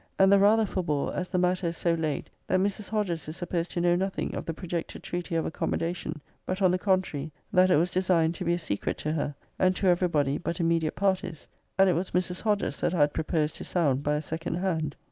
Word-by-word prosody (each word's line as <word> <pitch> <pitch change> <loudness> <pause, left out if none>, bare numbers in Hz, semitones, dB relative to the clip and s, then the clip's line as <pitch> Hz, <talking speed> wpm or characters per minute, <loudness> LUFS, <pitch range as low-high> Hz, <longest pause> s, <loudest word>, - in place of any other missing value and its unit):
And 195 0 +6
the 200 - +6
rather 215 +2 +5
forbore, 170 -8 -1
as 180 0 -3
the - - -1
matter 180 0 +1
is 165 0 -3
so 170 - +1
laid, 155 -3 -2 0.2
that 185 - +2
Mrs. 200 +2 -1
Hodges 190 -8 -1
is 155 +2 -6
supposed 175 -1 -2
to 175 - -2
know 175 0 +4
nothing 190 +2 -2
of - - -5
the 165 - -1
projected 170 -2 -5
treaty 175 0 -4
of 165 - +1
accommodation; 165 0 -2 0.2
but, 185 +1 -3
on 185 -3 +4
the 180 - +1
contrary, 180 -6 0 0.2
that 185 0 +5
it - - +5
was 170 +4 +2
designed 180 -3 +2
to 185 - -5
be 170 0 +2
a - - -2
secret 100 -12 -2
to 155 - -2
her, 145 -2 -2 0.2
and 185 0 +3
to 195 - -2
every 180 0 +4
body 145 -4 +1
but 170 +1 -3
immediate 165 -2 +1
parties; 185 -4 -1 0.3
and 195 0 +6
it 185 - +4
was 175 +3 -1
Mrs. 180 0 -1
Hodges 205 -9 0
that 180 - +1
I 160 - +2
had 145 0 +4
pro - - -1
posed 155 -3 0
to - - -7
sound 145 -7 +1
by 150 +1 0
a 150 - -1
second 165 +2 -3
hand. 165 -5 -1
175 Hz, 240 wpm, -28 LUFS, 160-185 Hz, 0.3 s, And